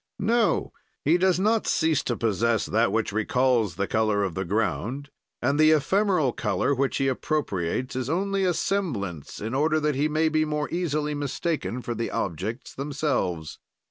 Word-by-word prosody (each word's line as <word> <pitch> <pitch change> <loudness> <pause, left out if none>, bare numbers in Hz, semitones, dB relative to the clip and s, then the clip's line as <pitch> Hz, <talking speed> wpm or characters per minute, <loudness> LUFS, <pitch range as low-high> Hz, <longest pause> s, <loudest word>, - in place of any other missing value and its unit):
"No; 225 +2 +1 0.3
he 165 +5 +4
does 185 -1 +3
not 215 +3 +2
cease 160 -2 +2
to 120 - -1
possess 115 +1 +1
that 115 +2 +2
which 110 -2 0
recalls 110 -2 +1
the 100 +2 -1
color 110 -1 +1
of 95 -4 -2
the 95 - -2
ground, 115 +8 -2 0.3
and 145 +2 +1
the 155 0 +6
ephemeral 155 - +2
color 140 - 0
which 135 0 0
he 135 - +1
appropriates 130 - -1
is 130 0 -2
only 195 +4 0
a 180 -2 +2
semblance, 100 - -2
in 110 +3 -4
order 155 +3 +2
that 150 -1 +1
he 140 +3 +1
may 155 +1 +1
be 155 0 +2
more 150 -1 -1
easily 155 -4 -1
mistaken 145 -2 -2
for 120 - -3
the 115 0 -3
objects 100 - -4
themselves. 135 - -2
140 Hz, 170 wpm, -26 LUFS, 110-155 Hz, 0.3 s, the